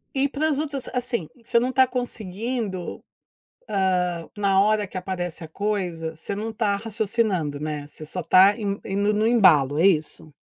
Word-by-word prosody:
E 270 +1 +2
para 295 +3 -1
as 290 -3 0
outras 285 -4 -3
assim, 245 -9 -2 0.2
você 235 - +2
não 250 +2 0
está 260 0 +4
conseguindo, 225 -4 -4 0.7
hã, 180 -3 0
na 195 -2 +3
hora 210 +1 +2
que 185 - -5
aparece 175 -2 -4
a - - -9
coisa, 175 -4 -3
você 180 +5 -4
não 215 +3 -4
está 210 -2 0
raciocinando, 205 -8 -1
né, 150 -1 -4
você 155 +1 -8
só 180 +4 -4
está 185 +4 +6
indo 200 -2 -2
indo 200 +2 0
no 215 +1 +2
embalo 155 - +5
é 170 - +5
isso? 155 -3 0
200 Hz, 170 wpm, -24 LUFS, 175-225 Hz, 0.7 s, está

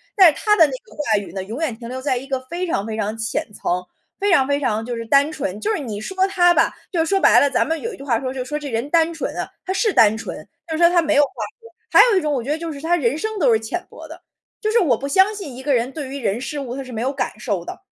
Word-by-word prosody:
但 390 -3 +7
是 - - -9
他 420 -1 +4
的 330 - +7
那 290 - -3
个 260 - -10
话 230 -8 +1
语 200 - -9
呢， 190 -1 -4
永 220 +8 -6
远 310 -8 -1
停 235 0 -9
留 260 +1 -5
在 265 -1 0
一 255 - -6
个 265 -1 -1
非 355 +2 -2
常 205 - -2
非 220 - -4
常 215 0 -2
浅 225 0 -2
层， 180 -2 -2 0.3
非 405 0 +1
常 270 -7 +4
非 285 0 +1
常 225 -6 -1
就 245 0 -4
是 230 0 -5
单 280 +5 +4
纯， 210 -10 -4
就 420 - -2
是 420 - -1
你 220 -7 -5
说 380 +9 0
他 355 -3 +4
吧， - - +2 0.2
就 330 -3 +1
说 390 +3 +1
白 - - +6
了， 285 - +3
咱 - - +1
们 325 +1 -1
有 465 0 -4
一 - - -10
句 - - -10
话 240 -5 +1
说 260 -1 -4
就 260 -1 -3
说： 295 +3 -3
“这 295 -1 -6
人 235 +3 -2
单 330 +1 +3
纯 325 - -4
啊。” - - -2 0.2
他 370 - -3
是 425 +1 +1
单 220 0 +5
纯， 225 - -7 0.2
就 320 - -3
是 345 - +2
说 340 - +8
他 350 -1 +3
没 310 -1 +1
有 290 - +6
话 280 - -1 0.3
说。 460 - -14 0.2
还 - - +6
有 405 - +3
一 - - +2
种 300 -2 -1
我 255 -4 -1
觉 265 - -7
得 305 - 0
就 330 0 -5
是 280 - -9
他 335 +3 +2
人 270 -6 +1
生 435 +6 -3
都 265 -8 +4
是 220 - +3
浅 225 +11 -5
薄 - - -11
的， - - -12 0.4
就 430 - 0
是 470 - +4
我 275 - +2
不 275 - -5
相 380 +8 +4
信 340 -11 -7
一 260 - -8
个 285 0 +1
人 240 +2 0
对 290 -1 -6
于 275 - -5
人、 230 -2 -1
事、 290 +2 -4
物 255 -3 -5
他 275 - -5
是 255 - -11
没 225 -2 -4
有 265 +2 -1
感 265 -5 -3
受 205 -5 -2
的， - - -8
280 Hz, 350 characters per minute, -21 LUFS, 235-335 Hz, 0.4 s, 说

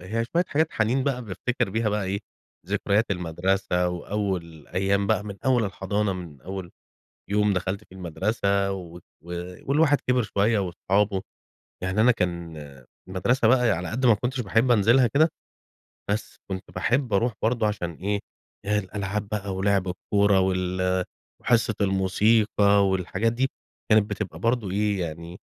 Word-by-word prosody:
هي 110 +6 -2
شوية 170 +9 +1
حاجات 155 +2 +2
حنين 120 +5 +1
بقى 130 -3 -1
بافتكر 105 +1 -2
بيها 110 +1 0
بقى 105 -1 -1
إيه، 100 +2 -2 0.5
ذكريات 105 +2 +1
المدرسة، 90 +1 0
وأول 90 -3 -4
أيام 100 +1 +1
بقى 110 -1 +1
من 100 -2 -6
أول 125 -4 +3
الحضانة، 100 +1 -1
من 85 -7 -8
أول 95 +1 -6 0.6
يوم 105 0 +3
دخلت 95 +2 -2
في - - -21
المدرسة 100 +2 0
و 90 -3 -7
و - - -10 0.7
والواحد 145 0 +4
كبر 125 0 +1
شوية 105 +2 +1
وأصحابه، 95 +1 0 0.6
يعني 95 +3 0
أنا 120 +3 +6
كان 85 -5 -3 0.5
المدرسة 110 +6 +2
بقى 125 -2 +4
على 90 0 -1
قد 125 +3 0
ما 115 - +7
كنتش 125 +4 -2
باحب 115 +4 +2
أنزلها 120 +3 +5
كده، 155 +8 +3 0.8
بس 105 +2 -2
كنت 95 0 -4
باحب 125 -2 0
أروح 115 +4 +2
برضه 115 -1 +2
عشان 100 -5 -2
إيه، 100 +5 -2 0.5
الألعاب 105 0 -2
بقى 100 -2 -3
ولعب 95 -1 +1
الكورة 100 +2 +2
وال 95 0 0 0.4
وحصة 115 -2 +2
الموسيقى 100 +1 +3
والحاجات 95 +4 0
دي، 130 +3 0 0.4
كانت 110 -1 +4
بتبقى 105 -1 -4
برضه 115 -4 0
إيه 105 0 0
يعني، 85 +1 -6
100 Hz, 145 wpm, -25 LUFS, 95-115 Hz, 0.8 s, ما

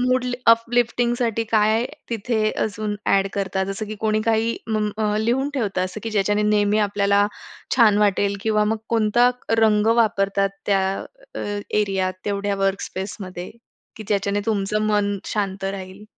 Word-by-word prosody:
Mood 255 0 +2 0.3
uplifting 240 +1 +1
साठी 230 -2 0
काय 220 +2 +3 0.3
तिथे 220 -1 0
अजून 210 0 -3
ॲड 195 0 +3
करता 190 -1 -1
जसं 195 +2 -4
की 215 - -5
कोणी 215 0 +1
काही 225 +1 +1 0.2
उम 210 -1 0 0.3
लिहून 255 +5 +1
ठेवता 205 -8 -1
असं 185 +3 -4
की 225 - -4
ज्याच्याने 205 0 +1
नेहमी 210 0 +2
आपल्याला, 200 0 +2 0.5
छान 215 -4 +5
वाटेल 200 -1 +2
किंवा 215 -1 +2
मग 220 +1 0
कोणता 230 +2 +3 0.3
रंग 215 -1 +4
वापरतात 195 -3 +2 0.2
त्या 195 -2 +3 0.5
अ, - - -5 0.3
एरियात 195 -3 0
तेवढ्या 200 0 -1
वर्क 195 0 0
स्पेस 190 +2 -5
मध्ये? 185 -1 -7 0.5
की 220 - -7
ज्याच्याने 200 0 0
तुमचं 210 0 0
मन 205 -1 +1
शांत 195 -2 -2
राहील. 195 +1 -6
210 Hz, 150 wpm, -22 LUFS, 200-220 Hz, 0.5 s, छान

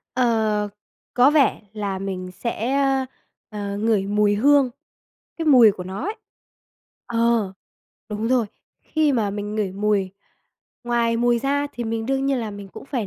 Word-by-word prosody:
Ờ, 220 -4 +1 0.4
có 255 +4 +5
vẻ 295 -4 +3
là 200 -3 -3
mình 185 -2 -5
sẽ, 235 +6 -2 0.7
ờ, 200 -2 -4
ngửi 210 -2 +1
mùi 205 0 +2
hương, 280 +3 +4 0.7
cái 325 - -3
mùi 245 -7 +8
của 185 -2 -8
nó 190 +5 -6
ấy. 420 +4 -3 0.9
Ờ, 230 -4 +1 0.6
đúng 215 +2 -3
rồi, 250 -4 +2 0.3
khi 310 -2 +1
mà 220 -5 +1
mình 205 +1 -4
ngửi 205 -4 -1
mùi 200 -1 0 0.7
ngoài 235 -1 +1
mùi 240 0 +2
ra 285 +3 0
thì 240 - -5
mình 225 0 -3
đương 270 0 0
nhiên 275 -2 +1
là 225 -2 -3
mình 200 -1 -9
cũng - - -11
phải 245 -7 -3
225 Hz, 155 wpm, -22 LUFS, 205-250 Hz, 0.9 s, mùi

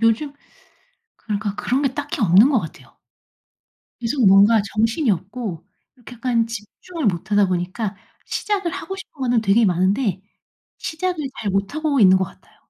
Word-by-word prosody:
요즘 230 +6 +2 0.8
그러니까 205 -1 -4
그런 260 +6 -1
게 270 -2 0
딱히 290 +1 -4
없는 205 +6 +6
것 265 - +3
같아요. 160 - -11 1.0
계속 240 0 +1
뭔가 200 +3 +6
정신이 225 +5 +1
없고 195 -1 -4 0.3
이렇게 245 0 -13
약간 235 -1 0
집중을 230 - -6
못 190 +1 -1
하다 205 -2 +4
보니까 185 +3 -3 0.3
시작을 400 -4 -2
하고 380 +2 -6
싶은 380 -6 -12
거는 245 -3 +2
되게 220 +2 +3
많은데 190 +2 +1 0.6
시작을 355 +1 -3 0.2
잘 205 - -2
못하고 280 +10 -1
있는 190 -2 +7
것 190 - +1
같아요. - - -17
225 Hz, 315 characters per minute, -21 LUFS, 195-275 Hz, 1.0 s, 있는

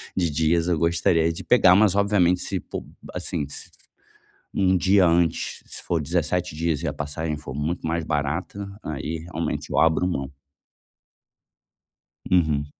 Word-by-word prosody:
de 85 -3 +1
dias 80 +3 +1
eu 85 - +1
gostaria 85 0 +2
de - - -8
pegar, 95 -7 +6
mas 100 -1 +4
obviamente, 100 -3 +3
se, - - -2
po, - - -7 0.3
assim, - - -3
s-se 70 - -10 0.8
um 95 -1 +3
dia 95 +1 +4
antes, 85 -1 +1
se - - -10
for 85 -3 0
17 85 +2 -1
dias 80 -1 -1
e 85 - -2
a 70 - -2
passagem 75 +1 -4
for 75 - -8
muito 75 +5 -3
mais 80 0 -1
barata, 75 +7 -2 0.2
aí, 80 +2 -4
realmente, 80 +1 -3
eu - - -2
abro 80 +2 +3
mão. 70 -6 -3 2.0
Uhum. 75 -5 +2
85 Hz, 150 wpm, -24 LUFS, 75-90 Hz, 2.0 s, pegar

